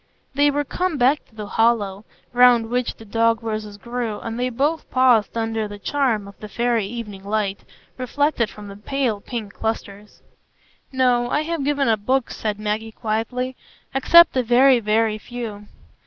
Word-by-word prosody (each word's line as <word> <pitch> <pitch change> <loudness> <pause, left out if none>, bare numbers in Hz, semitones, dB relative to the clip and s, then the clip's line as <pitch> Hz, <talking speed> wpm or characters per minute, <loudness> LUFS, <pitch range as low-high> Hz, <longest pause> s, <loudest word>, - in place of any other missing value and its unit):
They 285 +2 +4
were 290 +1 0
come 360 +3 -2
back 270 +4 +2
to - - -27
the 210 -1 -6
hollow, 210 -2 +1 0.3
round 245 -2 +5
which 250 0 -1
the 225 - -14
dog 230 +1 +1
roses 215 -2 -4
grew, 235 0 -4
and 230 +1 -5
they 250 +1 0
both 290 +6 -1
paused 245 -4 +3
under 225 -1 -1
the 205 0 -8
charm 230 -3 0
of 200 - -11
the 210 - -8
faëry 235 -1 0
evening 210 -3 -7
light, 200 -1 -1 0.4
reflected 255 -2 0
from 210 -1 -11
the 200 0 -10
pale 235 -2 -2
pink 215 -4 -6
clusters. 210 -2 -5 0.7
"No, 250 -2 +2
I 295 - +1
have 330 -2 -3
given 285 -1 +1
up 220 -3 +1
books," 260 +1 0
said 210 -2 -3
Maggie, 215 +1 -3
quietly, 245 +4 -2 0.4
"except 340 +5 +6
a 255 - +3
very, 250 +2 +5
very 215 0 +1
few." 215 -3 -7
230 Hz, 170 wpm, -22 LUFS, 215-255 Hz, 0.7 s, except